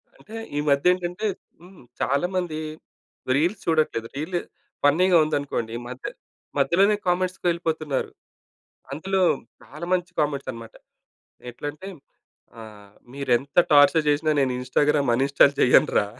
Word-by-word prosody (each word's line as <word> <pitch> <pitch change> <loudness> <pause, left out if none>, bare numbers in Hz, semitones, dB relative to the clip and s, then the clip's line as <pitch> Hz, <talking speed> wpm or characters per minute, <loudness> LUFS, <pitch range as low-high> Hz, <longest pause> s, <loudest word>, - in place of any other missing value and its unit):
అంటే, 220 +2 -13 0.2
ఈమధ్య 145 +4 +3
ఏంటంటే, 180 +4 -3 0.3
హ్మ్. 180 -3 -16 0.2
చాలా 140 +6 +1
మంది 170 -4 -2 0.8
రీల్స్ 175 +8 0
చూడట్లేదు. 155 -8 0
రీల్లు 170 +4 -2 0.4
ఫన్నీగా 170 +5 +4
ఉందనుకోండి, 140 -7 -3
మధ్య 125 +1 -9 0.5
మధ్యలోనే 200 +4 +3
కామెంట్స్‌కి 185 +1 -1
వెళ్ళిపోతున్నారు. 160 -4 -2 0.8
అందులో 190 +6 -1 0.4
చాలామంచి 175 +4 -3
కామెంట్స్ 140 -3 -1
అన్నమాట. 115 -1 -11 0.8
ఎట్లంటే 145 +9 -7 0.7
ఆహ్, 105 -2 -13 0.2
మీరు 140 -1 -5
ఎంత 140 +6 -5
టార్చర్ 145 +2 +5
చేసినా 155 +2 +1
నేను 130 -2 +2
ఇన్‌స్టా‌గ్రామ్ 140 +2 +1
అన్‌ఇన్‌స్టాల్ 140 +2 +4
చేయను 125 - +5
రా! 105 - +1
150 Hz, 110 wpm, -24 LUFS, 140-175 Hz, 0.8 s, టార్చర్